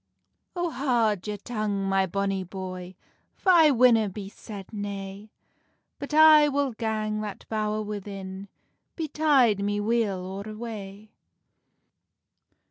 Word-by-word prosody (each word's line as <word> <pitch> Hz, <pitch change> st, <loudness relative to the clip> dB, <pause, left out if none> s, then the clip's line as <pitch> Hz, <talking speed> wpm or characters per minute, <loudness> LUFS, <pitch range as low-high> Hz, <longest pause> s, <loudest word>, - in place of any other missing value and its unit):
"Oh, 350 Hz, -1 st, -1 dB
haud 235 Hz, -8 st, 0 dB
your 210 Hz, 0 st, -3 dB
tongue, 210 Hz, -2 st, -3 dB
my 195 Hz, 0 st, +2 dB
bonny 195 Hz, +1 st, -1 dB
boy, 185 Hz, 0 st, -7 dB, 0.4 s
For 375 Hz, -, +2 dB
I 325 Hz, -4 st, +7 dB
winna 235 Hz, -5 st, +4 dB
be 195 Hz, 0 st, -7 dB
said 200 Hz, -1 st, -10 dB
nay; 200 Hz, 0 st, -6 dB, 0.7 s
But 280 Hz, -, -6 dB
I 305 Hz, -1 st, +7 dB
will 280 Hz, -1 st, 0 dB
gang 215 Hz, -1 st, -2 dB
that 210 Hz, -2 st, -7 dB
bowr 215 Hz, -1 st, -1 dB
within, 195 Hz, -2 st, -7 dB, 0.5 s
Betide 295 Hz, -, +2 dB
me 205 Hz, 0 st, 0 dB
weal 215 Hz, -2 st, +1 dB
or 190 Hz, +2 st, -6 dB
wae." 215 Hz, -2 st, -8 dB
210 Hz, 120 wpm, -26 LUFS, 195-240 Hz, 0.7 s, I